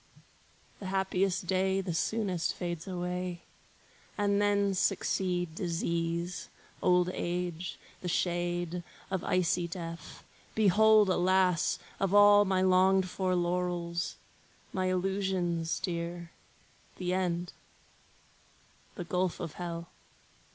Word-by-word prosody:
The 195 - -6
happiest 190 -1 0
day 190 +2 +1
the 185 -3 -3
soonest 185 -1 -1
fades 175 -1 -4
away; 180 -1 -3 0.8
And 205 -1 +2
then 200 -1 +2
succeed 180 -2 0
disease, 170 0 -2 0.3
old 180 0 +3
age, 175 0 -3 0.2
the 180 - -4
shade 175 0 -1 0.3
Of 190 -2 -1
icy 175 -1 +1
death. 170 -1 -7 0.3
Behold, 215 +1 +5
alas! 185 -1 +2 0.2
Of 195 0 +1
all 205 0 +8
My 190 -1 +2
longed 190 0 +4
for 185 0 -1
laurels, 175 -1 -1 0.6
my 185 -1 0
illusions 185 -3 0
dear, 170 -1 -4 0.7
The 180 -1 -1
end,—the 180 -1 -1 1.5
gulf 180 +1 -1
of 160 - -5
hell! 170 -1 -4
180 Hz, 100 wpm, -30 LUFS, 175-190 Hz, 1.5 s, all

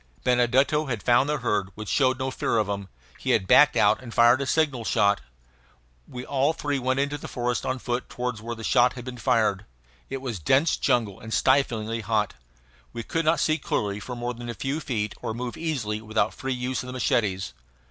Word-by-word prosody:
Benedetto 130 +5 +2
had 115 -7 -3
found 125 +4 +3
the 150 - +1
herd, 105 -6 -1
which 110 0 -7
showed 130 +1 +2
no 130 +1 -2
fear 115 - -1
of 110 -2 +1
him; 100 -1 -4 0.3
he - - -4
had 95 - +3
backed 150 +9 +6
out 105 +4 +3
and 120 -2 -9
fired 120 +4 +5
a 140 - -2
signal 145 -7 +1
shot. 105 -2 +2 0.9
We 125 0 -7
all 140 +3 +1
three 145 -3 -2
went 130 +1 0
into 140 +1 -1
the - - -7
forest 120 0 -2
on 130 - -1
foot 120 0 -3
toward 125 -3 -3
where 115 +2 -5
the 115 - -9
shot 125 +2 +4
had 120 -2 -9
been 125 -1 -7
fired. 105 -3 +1 0.5
It 135 - -4
was 125 -7 -5
dense 135 - +3
jungle 110 -5 0
and 110 - -9
stiflingly 115 -4 +1
hot. 105 -1 0 0.6
We 115 - -5
could 165 +4 -2
not 160 +2 +3
see 155 0 +1
clearly 105 -6 -2
for 125 +5 -6
more 120 +1 -3
than 120 0 -8
a 120 - -4
few 135 +8 -2
feet, 105 -8 -2
or 115 -2 -3
move 120 0 -4
easily 125 -10 -3
without 110 0 0
free 135 0 -3
use 125 +1 -2
of 125 - -9
the 125 - -6
machetes. 105 -6 0
120 Hz, 210 wpm, -25 LUFS, 110-130 Hz, 0.9 s, backed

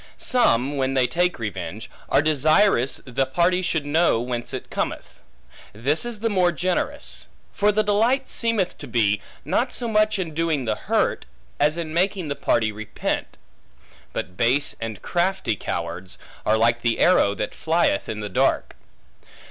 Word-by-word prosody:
Some, 140 - +2
when 135 0 0
they 130 -1 +4
take 180 +6 +1
revenge, 105 -1 -5 0.2
are - - +3
desirous, 155 - +3
the 130 +1 -1
party 175 +7 +2
should 160 -4 -1
know, 150 -4 +3
whence 120 0 -4
it - - -6
cometh. - - -4 0.5
This 135 - 0
is 235 -3 -5
the 230 - +1
more 185 -4 +3
generous. 185 - -2 0.3
For 210 0 +3
the 215 +1 +2
delight 230 +6 +2
seemeth 225 -6 -1
to 145 - -8
be, 105 -4 +1 0.2
not 250 +1 0
so 240 - -1
much 215 -1 +2
in 175 -5 -3
doing 160 -4 0
the 110 - +1
hurt, - - -1 0.3
as 150 +2 +2
in 160 -2 -4
making 185 -1 0
the 140 - -2
party 110 -5 +1
repent. 110 0 -4 0.7
But 90 - -5
base 130 +8 +2
and 110 -4 -5
crafty 175 - 0
cowards, 85 0 -5 0.3
are 110 - +4
like 115 +1 +2
the 115 -1 +1
arrow 105 - +4
that - - -3
flieth 160 -11 +1
in 105 -1 -4
the 105 - -3
dark. 90 - +1
150 Hz, 160 wpm, -23 LUFS, 115-185 Hz, 0.7 s, they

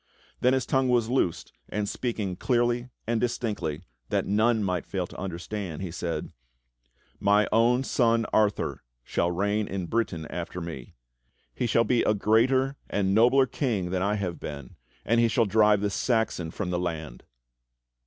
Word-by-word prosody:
Then 125 +1 +3
his 130 -3 +1
tongue 135 -1 +1
was 120 -2 +2
loosed 125 -10 0 0.2
and 105 0 -2
speaking 105 -6 -3
clearly 120 +3 0 0.2
and 115 0 0
distinctly, 105 -10 -2 0.3
that - - 0
none 110 +2 +2
might 90 -3 -2
fail 95 -2 -2
to - - -13
understand, 95 -1 -5
he 90 - -4
said: 85 0 -4 0.9
"My 105 +1 +3
own 120 +3 +3
son 115 -3 +2
Arthur 105 -1 +1 0.2
shall 85 - 0
reign 100 +4 0
in 95 -2 -3
Britain 85 -5 -1
after 90 +1 -5
me. 80 -8 -7 0.6
He 125 - -1
shall 115 +1 +3
be 120 0 +2
a 105 - +2
greater 130 +6 +2
and 95 -1 +1
nobler 125 +5 +5
king 110 - -2
than 95 -1 0
I 100 +2 +1
have 95 -5 -3
been, 70 -4 -8 0.3
and 115 0 +3
he 115 - +4
shall 115 0 +2
drive 105 0 +4
the 105 -1 0
Saxon 110 -7 0
from 90 +2 -4
the 90 - 0
land." 80 -7 -4
105 Hz, 165 wpm, -27 LUFS, 90-120 Hz, 0.9 s, nobler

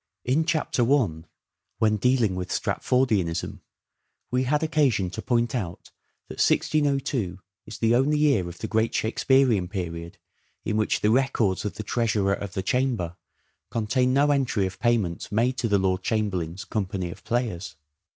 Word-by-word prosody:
In 145 +6 +2
Chapter 155 -6 0
I, 90 - +1 0.5
when 110 -1 +2
dealing 120 -3 +2
with 90 0 -4
Stratfordianism, 105 -10 0 0.7
we 125 +1 +1
had 150 +4 +1
occasion 140 - +1
to - - -5
point 120 -2 0
out 95 -9 -5 0.4
that - - -9
1602 135 - +1 0.3
is 110 - -8
the 115 0 +2
only 135 +5 +3
year 140 -13 +2
of 85 - -10
the - - -4
great 110 +1 0
Shakespearean 115 -3 +2
period 85 -3 -5 0.5
in - - -1
which 110 0 +1
the 105 - +3
records 120 -7 +1
of 105 - -3
the 110 - -5
Treasurer 105 -3 +1
of 100 -1 -5
the 95 - -2
Chamber 120 -10 0 0.5
contain 125 +3 +1
no 145 +2 +3
entry 130 -8 +1
of 95 -1 -6
payments 110 -10 0
made 120 +5 +1
to 115 - 0
the 105 -2 +3
Lord 95 -1 0
Chamberlain's 95 -5 -2
company 95 -4 -3
of - - -12
players. 105 -9 -2
110 Hz, 155 wpm, -25 LUFS, 95-130 Hz, 0.7 s, only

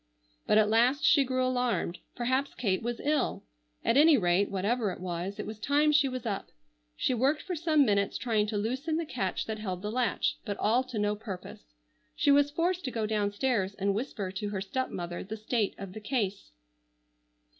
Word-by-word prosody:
But 210 - +4
at 215 -1 +5
last 240 +6 +3
she 280 - +6
grew 255 0 0
alarmed. 245 -8 0 0.2
Perhaps 260 +3 0
Kate 195 -6 0
was 240 +1 -3
ill. 295 -1 0 0.4
At 235 - +3
any 305 0 +7
rate, 185 0 +2
whatever 205 +3 0
it 180 - -6
was, 180 +2 -4
it 210 - -4
was 215 0 -7
time 290 +5 +3
she 290 -2 +4
was 255 -1 -5
up. 205 -4 -3 0.5
She - - +1
worked 270 +5 +1
for 370 -2 -3
some 310 -3 +3
minutes 200 -3 +1
trying 220 -4 +1
to 210 -1 -2
loosen 260 +9 -1
the 335 - -2
catch 230 -10 -2
that 220 -1 -4
held 185 -3 -4
the 210 - -2
latch, 250 +1 0
but 205 -3 -4
all 235 +5 +2
to 255 -3 -6
no 210 0 +1
purpose. 180 - -9 0.4
She - - +3
was 285 0 +5
forced 350 +4 0
to - - -1
go 225 -2 -1
down 210 -1 0
stairs 205 -4 0
and 200 0 0
whisper 205 -4 -3
to 200 +2 -4
her 200 -2 -3
stepmother 190 -5 -3
the 215 +3 -6
state 215 -1 -1
of 195 -2 -8
the 215 - -8
case. 205 - -2
220 Hz, 200 wpm, -29 LUFS, 200-260 Hz, 0.5 s, any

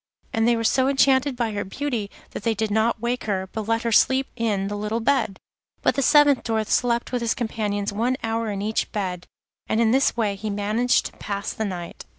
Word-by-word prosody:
And 225 +1 +2
they 240 - +4
were 230 - -2
so 260 +3 +3
enchanted 270 0 +3
by 235 -2 -1
her 205 -1 -2
beauty 230 0 -3 0.2
that - - -6
they 225 +2 0
did 215 0 -1
not 220 +2 +1
wake 240 +2 -2
her, 190 -3 -1
but 220 -1 -5
let 230 0 +1
her 230 - 0
sleep 265 +4 +4
on - - -1
in 195 -2 0
the 205 - -3
little 210 +2 -2
bed. 230 -5 +1 0.5
But - - +3
the 275 - 0
seventh 290 0 +5
Dwarf 220 -2 -1
slept 235 -1 +1
with 250 -1 -1
his 230 -1 0
companions 210 -4 -2
one 240 +5 0
hour 225 0 -1
in 200 -1 -3
each 215 +1 -1
bed, 185 -4 -3 0.4
and 220 - +1
in 225 -1 +3
this 265 -1 +2
way 215 -3 +1
he 210 +2 -5
managed 210 +4 +1
to - - -4
pass 200 -1 -4
the 220 - -3
night. 175 -4 -6
225 Hz, 225 wpm, -23 LUFS, 205-240 Hz, 0.5 s, seventh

